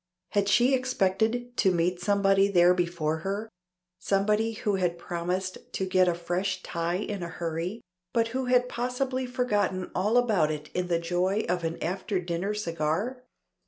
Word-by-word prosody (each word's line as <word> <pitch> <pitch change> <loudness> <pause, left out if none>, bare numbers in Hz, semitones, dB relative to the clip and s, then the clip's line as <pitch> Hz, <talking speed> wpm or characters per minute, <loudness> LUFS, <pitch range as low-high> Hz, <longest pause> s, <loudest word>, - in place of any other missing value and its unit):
Had 200 -1 +1
she 245 +5 +4
expected 245 -1 0
to 190 - +4
meet 175 +1 +1
somebody 200 -1 +3
there 180 -2 +5
before 170 -3 -1
her 195 +6 -3 0.5
somebody 210 +4 +1
who 210 -2 -1
had 175 -2 0
promised 180 +2 -3
to 190 - -1
get 185 -1 +3
a 175 - +2
fresh 180 +2 -2
tie 170 0 -2
in 200 0 -3
a 170 - -3
hurry, 170 +5 -4 0.3
but 230 -1 +1
who 260 +2 -2
had 250 0 +3
possibly 255 +1 -2
forgotten 205 -7 0
all 210 +6 +2
about 210 -11 +3
it 150 -1 -5
in 180 0 -1
the 170 -1 +2
joy 180 +5 0
of 175 0 -1
an 165 0 -2
after 185 +3 -1
dinner 180 +4 -2
cigar? 175 +7 -2
190 Hz, 160 wpm, -28 LUFS, 175-220 Hz, 0.5 s, there